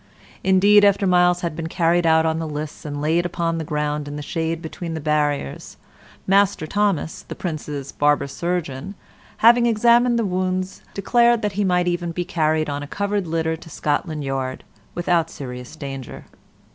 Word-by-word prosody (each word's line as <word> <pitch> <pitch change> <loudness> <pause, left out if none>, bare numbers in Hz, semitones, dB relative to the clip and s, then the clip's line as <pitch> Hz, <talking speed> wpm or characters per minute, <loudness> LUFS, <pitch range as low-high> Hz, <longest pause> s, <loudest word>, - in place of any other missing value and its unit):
Indeed, 200 +2 +5
after 200 0 +4
Myles 180 -1 +3
had 170 -3 -3
been 165 0 -4
carried 170 0 +2
out 160 0 +4
of 160 0 0
the 165 - -3
lists 150 0 -6
and 145 -1 -4
laid 165 +3 +2
upon 165 -1 -2
the - - -3
ground 150 -1 -2
in 145 - -6
the 150 - -5
shade 165 +1 -2
between 165 0 -6
the - - -3
barriers, 150 - -1 0.5
Master 195 -3 +3
Thomas, 200 -3 -1
the - - -9
Prince's 150 -5 -5
barber 145 0 +2
surgeon, 170 +2 -4 0.5
having 240 +1 +7
examined 235 +2 +4
the 230 - +1
wounds, 185 0 -2
declared 235 +2 +3
that 210 - 0
he 205 +2 -1
might 180 -2 +2
be 175 - +1
even 175 -1 -3
carried 160 -3 0
on 145 0 -3
a 145 - -6
covered 200 +1 -2
litter 160 0 -1
to 165 - -13
Scotland 155 0 -2
Yard 135 -1 -3 0.3
without 175 -1 +1
serious 125 0 -8
danger. 135 -4 -7
165 Hz, 170 wpm, -22 LUFS, 150-185 Hz, 0.5 s, having